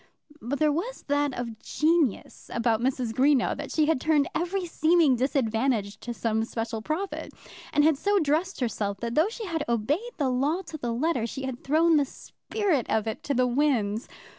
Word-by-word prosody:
But 265 +5 -2
there 305 0 +3
was 420 +12 -3
that 290 0 +2
of 235 -2 -5
genius 310 - 0
about 230 -1 +1
Mrs. 250 -2 -1
Greenow, 265 +2 +3
that - - -6
she 310 - +2
had 310 -4 +1
turned 300 -3 +3
every 360 +2 -1
seeming 330 -4 +3
disadvantage 230 -4 0
to 240 - -6
some 225 -1 -1
special 225 0 -4
profit, 320 - -3 0.4
and 295 - +3
had 305 -2 +3
so 410 0 +2
dressed 320 +1 0
herself 200 -4 -2
that 235 0 -2
though 320 - +3
she 455 -1 -6
had 330 -5 -2
obeyed 290 - -1
the 280 -4 +1
law 290 +9 0
to 325 -2 -7
the 240 -2 -2
letter, 250 -1 0
she 265 +3 -6
had 260 -2 -5
thrown 320 +3 +4
the 290 - +3
spirit 345 - -2
of 220 -1 +1
it 220 - -4
to 280 - 0
the 255 +1 +3
winds. 245 -5 +1
275 Hz, 190 wpm, -27 LUFS, 235-320 Hz, 0.4 s, thrown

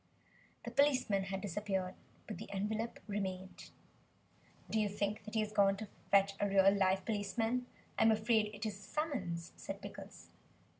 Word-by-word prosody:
The - - -4
policeman 255 -9 +3
had 195 0 -3
disappeared. 195 -1 -2 0.3
But 215 - -6
the - - -8
envelope 215 +4 -2
remained. 190 -3 -4 1.0
"Do 220 - 0
you 210 -1 +2
think 205 +1 -2
that 215 - -7
he 220 - +3
has 215 0 -2
gone 195 -1 +4
to 215 -1 -6 0.2
fetch 200 0 +5
a 205 - +1
real 195 0 +6
live 190 -1 +2
policeman? 225 +4 0 0.3
I - - +3
am 225 - +7
afraid 220 0 +3
it 205 - -5
is 205 -2 -3
a - - -14
summons," 195 - -3
said - - -6
Pickles. - - -10
205 Hz, 165 wpm, -35 LUFS, 195-220 Hz, 1.0 s, am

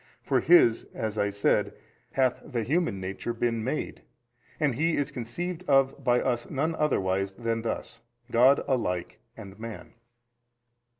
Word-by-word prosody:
For - - +2
His 155 -10 +5
(as 110 -1 -3
I 100 0 +2
said) 100 0 +1 0.4
hath 130 -2 +1
the 120 -5 -3
human 130 - 0
nature 95 +5 -4
been 115 -1 -1
made, 130 +6 -3 0.6
and 150 -4 +2
He 160 +6 +1
is 145 0 -1
conceived 160 +9 -5
of 135 -1 +3
by 125 0 +3
us 120 -2 -1
none 155 +4 -1
otherwise 95 -11 0
than 115 +1 -2
thus, 115 0 -4 0.3
God 130 +4 +5
alike 90 -10 -1 0.2
and 100 -2 -11
man. 115 -1 -8
120 Hz, 140 wpm, -27 LUFS, 110-140 Hz, 0.6 s, His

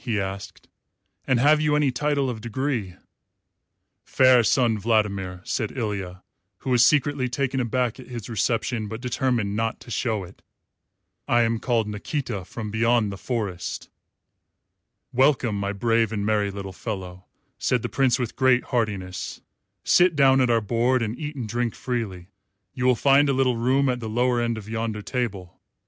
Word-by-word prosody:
he 115 -5 -1
asked; 95 -1 -6 0.6
"and 130 -3 +3
have 150 +4 +5
you 150 -1 +2
any 150 -3 +2
title 145 +1 0
of 115 -4 -4
degree?" 115 -5 -3 1.1
"Fair 130 -2 +5
Sun 115 -1 +2
Vladimir," 100 -4 0
said 110 - -2
Ilya, 100 -5 -4 0.3
who 130 - -4
was 125 -1 +5
secretly 145 -3 +2
taken 135 +1 -1
aback 125 0 -1
at 130 - -11
his 120 -4 -7
reception, 115 0 -1
but 110 +2 -6
determined 120 -4 -1
not 115 +1 -1
to 120 - -11
show 110 -4 -1
it, 90 +2 -14 0.9
"I 120 0 +4
am 115 0 0
called 115 -3 0
Nikita 105 - -4
from 105 +1 -6
beyond 115 -1 +2
the - - -5
Forest." 100 -5 -4 1.2
"Welcome, 125 -5 +2
my 100 0 -1
brave 115 +1 +1
and 100 -2 -2
merry 105 -1 +1
little 100 -1 -7
fellow," 95 -3 -6 0.3
said 125 -3 0
the - - -1
Prince 130 -3 +2
with 120 -3 -4
great 130 -1 +3
heartiness; 100 -6 -3 0.4
"sit 175 -2 +4
down 135 -2 +5
at 125 - +2
our 115 -1 +3
board 120 +4 +1
and 110 +1 -3
eat 150 +2 -6
and 125 -5 -4
drink 120 +1 -2
freely. 100 -8 -4 0.4
You 125 - -3
will 125 - +5
find 140 +3 +4
a - - +3
little 130 -2 +2
room 130 +4 +2
at 125 -1 0
the 110 -2 -5
lower 120 +2 +1
end 115 -1 -1
of 105 -2 -9
yonder 110 -1 -3
table. 105 -8 -4
115 Hz, 165 wpm, -24 LUFS, 105-130 Hz, 1.2 s, have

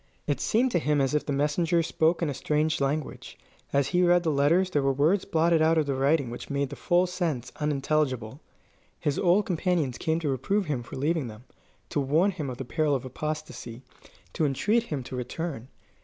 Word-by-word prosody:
It - - -1
seemed 245 +3 +2
to 175 - +2
him 150 -2 +1
as 135 +1 +1
if 150 - 0
the - - -1
messengers 160 +4 +1
spoke 165 +2 +1
in 160 - 0
a - - -3
strange 150 +2 0
language. 140 +2 -3 0.3
As 140 -1 +1
he 180 0 +2
read 175 0 +4
the 160 - +1
letters 165 +7 +3
there 145 - +2
were 135 0 +2
words 155 +9 +2
blotted 165 0 +2
out 160 +1 +4
of 155 - +2
the 140 - -1
writing 135 -1 +1
which 120 - -8
made 140 -1 -1
the - - -5
full 175 +1 +2
sense 165 -9 -3
unintelligible. 140 -4 -1 0.6
His 145 -3 -1
old 190 +3 +3
companions 170 -8 0
came 160 +1 0
to 150 - -1
reprove 195 - 0
him 145 -6 -2
for 115 - -10
leaving 150 0 0
them, 110 +1 -10 0.5
to - - -1
warn 155 +8 +2
him 155 -7 -5
of 125 - -6
the 135 - -5
peril 150 +2 +1
of 130 - -4
apostasy, 130 -3 -6 0.5
to 165 - -1
entreat 205 - +2
him 145 - -4
to 130 - -7
return. 125 +1 -5
150 Hz, 205 wpm, -27 LUFS, 135-170 Hz, 0.6 s, read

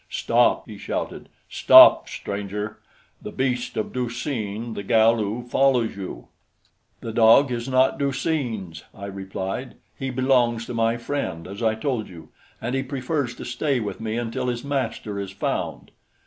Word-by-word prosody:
"Stop!" - - +2
he - - -10
shouted. - - -4 0.2
"Stop, - - +7
stranger! 105 +1 -5 0.4
The - - -6
beast 125 -2 -2
of 110 - -2
Du 125 -2 -1
seen 115 -3 -4
the 100 - -5
Galu 110 +1 +2
follows 125 -2 +2
you." 95 -2 -7 0.7
"The 115 - -5
dog 115 +4 +6
is 120 +1 -3
not 130 0 +3
Du 140 -1 +1
seen's," 115 - -3
I 100 - -8
replied. 95 +5 -5 0.2
"He 135 - -4
belongs 125 -3 +2
to 125 - -6
my 115 0 +1
friend, 120 -10 -4
as 100 +3 -8
I 110 -1 +2
told 115 -1 -2
you, 80 -4 -12 0.3
and 120 +2 -3
he 135 - +1
prefers 135 -1 -3
to - - -8
stay 130 +2 -1
with 105 0 -5
me 110 0 -2
until 120 +1 -3
his 120 -1 -2
master 130 -7 -3
is 100 -1 -4
found." 95 - -3
115 Hz, 160 wpm, -24 LUFS, 105-130 Hz, 0.7 s, Stop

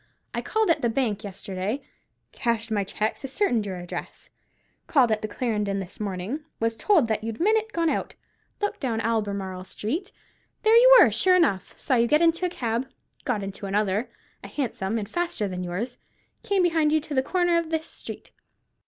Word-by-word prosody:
I - - -1
called 440 -4 +1
at - - +1
the 235 - +2
bank 225 -4 -1
yesterday, 200 +5 -4 0.5
cashed 230 -1 -1
my 205 -2 +1
cheques, 215 +5 -2
ascertained 255 - 0
your 190 - -4
address; 175 -1 -7 0.6
called 255 -7 +4
at 215 0 +1
the 215 - -2
Clarendon 210 -3 -1
this 190 -1 -8
morning, 200 +6 -3 0.2
was 230 0 0
told 335 - +3
you'd 225 0 -4
that - - -20
minute 440 +3 +2
gone 335 -4 0
out; - - -1 0.5
looked 410 - -1
down 235 -5 -1
Albemarle 200 -5 -2
Street; 300 - -4 0.5
there 440 +1 +6
you - - +9
were, - - +7
sure 370 -1 +4
enough; 280 - +1
saw - - -1
you 235 0 +3
get 300 +5 +4
into 335 +2 +3
a - - -4
cab; 240 -4 -2 0.4
got 235 -7 0
into 195 +1 -5
another—a 205 +3 -3
Hansom, 225 -6 -2
and 210 -2 -3
faster 345 - -1
than 180 -1 -4
yours—came 245 - -3
behind 325 -3 +3
you 315 - +4
to 300 - -7
the 260 - +3
corner 350 +3 +2
of 335 -1 -4
this 320 -1 -1
street." - - -9
235 Hz, 180 wpm, -25 LUFS, 205-330 Hz, 0.6 s, you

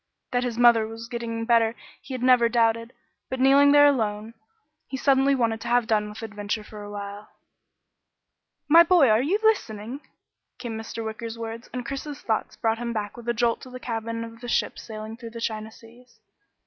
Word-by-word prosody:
That 245 -1 +1
his 240 -2 -3
mother 235 -2 +5
was 225 +1 -8
getting 230 -1 -4
better 230 -1 +3 0.3
he 270 -1 -7
had 250 - -5
never 250 -2 +5
doubted, 230 0 +1 0.4
but 260 - -4
kneeling 275 +2 +6
there 290 0 +7
alone, 220 -5 0 0.5
he 265 - -5
suddenly 275 +1 +3
wanted 230 -3 0
to - - -6
have 245 -1 +3
done 210 -1 +1
with 210 +2 -9
adventure 210 0 -4
for 210 0 -11
a 205 - -8
while. 205 0 -7 1.4
"My 330 +3 +8
boy 340 -6 +5
are 215 +2 +4
you 330 +10 +1
listening?" 250 - 0 0.6
came 235 -3 -5
Mr. 220 +1 -6
Wicker's 225 +1 -6
words, 230 +1 -7
and 250 -1 -5
Chris's 280 +1 -5
thoughts 220 -2 -2
brought 225 0 0
him 235 -1 -3
back 210 -2 -4
with 240 0 -7
a - - +2
jolt 235 0 +1
to 255 - -11
the 255 0 -8
cabin 230 -1 -4
of 230 +1 -11
a - - -5
ship - - 0
sailing 220 0 -8
the 230 0 -8
China 220 -1 -4
seas. 235 +3 -18
230 Hz, 190 wpm, -25 LUFS, 220-250 Hz, 1.4 s, My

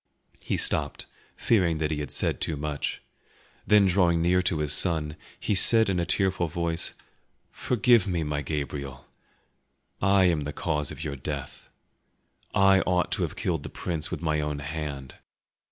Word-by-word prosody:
He - - -2
stopped, - - -1 0.3
fearing 90 -8 +2
that 80 0 -1
he 75 - -2
had 75 - -4
said - - -1
too 80 - -1
much; 75 0 -3 0.6
then 105 -1 +6
drawing 90 -3 +3
near 90 +2 +3
to 90 -3 0
his 75 -1 +1
son, 80 -4 +1 0.2
he - - -1
said 110 +2 +4
in 90 - 0
a 85 - -1
tearful 95 -2 +1
voice, 85 0 -2 0.6
"Forgive 120 -3 +2
me, 85 -4 -1
my 75 -1 -2
Gabriel; 70 -2 -5 1.0
I 100 0 +4
am 85 -4 +2
the 75 0 -5
cause 75 -3 -1
of 80 - -7
your 75 -3 -4
death. 70 0 -7 0.8
I 95 -1 +5
ought 90 -2 0
to - - +1
have - - -2
killed 80 -5 -1
the - - -7
prince 85 -1 -3
with - - -5
my 75 -1 +1
own 75 -1 -3
hand. 70 -2 -6
80 Hz, 165 wpm, -26 LUFS, 75-90 Hz, 1.0 s, then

